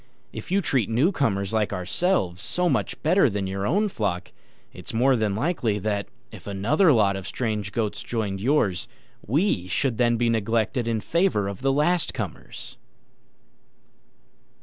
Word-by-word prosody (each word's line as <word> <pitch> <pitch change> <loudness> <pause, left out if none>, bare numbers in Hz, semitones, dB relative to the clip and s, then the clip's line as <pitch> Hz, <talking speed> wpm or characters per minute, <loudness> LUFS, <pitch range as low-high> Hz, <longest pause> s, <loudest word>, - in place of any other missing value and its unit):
If - - -8
you 195 +2 +2
treat 130 - +1
newcomers 115 - +1
like 110 -2 +1
ourselves 95 - 0
so 175 - 0
much - - -1
better 160 -1 +4
than 100 -2 -2
your 95 +1 -2
own 205 +9 +2
flock, 100 - -3 0.4
it's - - -7
more 130 +3 +4
than 110 -4 0
likely 120 - 0
that, 100 0 -2 0.2
if 105 -4 -12
another 115 - +3
lot 105 -6 +3
of 95 -1 -6
strange 105 -5 -2
goats 105 +1 -2
joined 105 -5 -3
yours, 105 - +1 0.4
we 135 - +1
should 115 +5 -1
then 120 -1 +3
be 120 +1 +1
neglected 115 +1 0
in 115 -2 0
favour 170 - +1
of 100 +2 -6
the 135 0 +2
last 150 +3 +1
comers." - - -6
115 Hz, 150 wpm, -25 LUFS, 100-140 Hz, 0.4 s, better